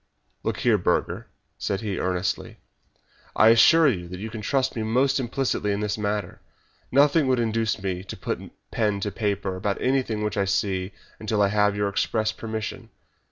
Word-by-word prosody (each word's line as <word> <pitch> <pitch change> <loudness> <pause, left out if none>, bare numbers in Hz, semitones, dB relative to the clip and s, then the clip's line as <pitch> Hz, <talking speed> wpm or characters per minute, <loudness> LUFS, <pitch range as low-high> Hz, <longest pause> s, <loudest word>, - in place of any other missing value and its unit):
"Look - - -3
here, - - +3
Burger," - - 0 0.3
said 95 - -2
he, 100 -4 -3
earnestly, 90 0 -2 0.8
"I 110 - +6
assure 155 +8 +7
you 90 -10 0
that 90 +1 -8
you 110 +2 -6
can 110 -1 -6
trust 135 +4 0
me 115 - -2
most 130 +5 +2
implicitly 125 -4 -1
in 100 - -1
the 105 -1 -1
matter. 105 -2 -3 0.5
Nothing 145 +2 +4
would 130 -1 +3
induce 115 -3 0
me 90 -2 -2
to - - -7
put - - -3 0.3
pen 105 -3 0
to 105 - -2
paper 100 -2 -2
about 100 +2 -2
anything 125 -5 0
which 105 - -2
I 100 - +2
see 95 -1 -1 0.3
until 110 -1 -1
I 100 - +3
have 105 0 +2
your 105 0 0
express 110 +2 0
permission. 110 -1 -5
105 Hz, 175 wpm, -25 LUFS, 100-115 Hz, 0.8 s, assure